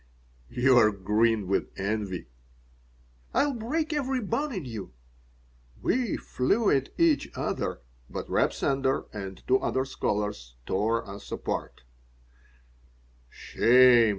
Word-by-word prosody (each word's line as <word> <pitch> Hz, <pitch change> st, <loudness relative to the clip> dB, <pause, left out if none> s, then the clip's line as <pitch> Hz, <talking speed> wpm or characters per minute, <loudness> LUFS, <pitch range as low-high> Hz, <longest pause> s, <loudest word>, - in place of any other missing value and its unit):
"You're 120 Hz, -3 st, +5 dB
green 105 Hz, +2 st, +1 dB
with 95 Hz, -, 0 dB
envy." 100 Hz, -2 st, -2 dB, 1.1 s
"I'll 285 Hz, -1 st, +3 dB
break 305 Hz, +8 st, -2 dB
every 270 Hz, -3 st, 0 dB
bone 245 Hz, +7 st, -2 dB
in 185 Hz, -, -4 dB
you." 110 Hz, -, -7 dB, 0.9 s
We 250 Hz, -4 st, 0 dB
flew 200 Hz, -, +1 dB
at 135 Hz, -1 st, +1 dB
each 330 Hz, -3 st, +3 dB
other, -, -, -2 dB, 0.3 s
but -, -, -5 dB
Reb -, -, +2 dB
Sender 135 Hz, -1 st, 0 dB
and 95 Hz, -3 st, -7 dB
two 130 Hz, +1 st, +4 dB
other 130 Hz, 0 st, 0 dB
scholars 105 Hz, -, -3 dB
tore 110 Hz, +4 st, 0 dB
us 100 Hz, +1 st, -10 dB
apart -, -, -4 dB, 1.5 s
"Shame!" 120 Hz, -, +5 dB
125 Hz, 110 wpm, -27 LUFS, -, 1.5 s, You're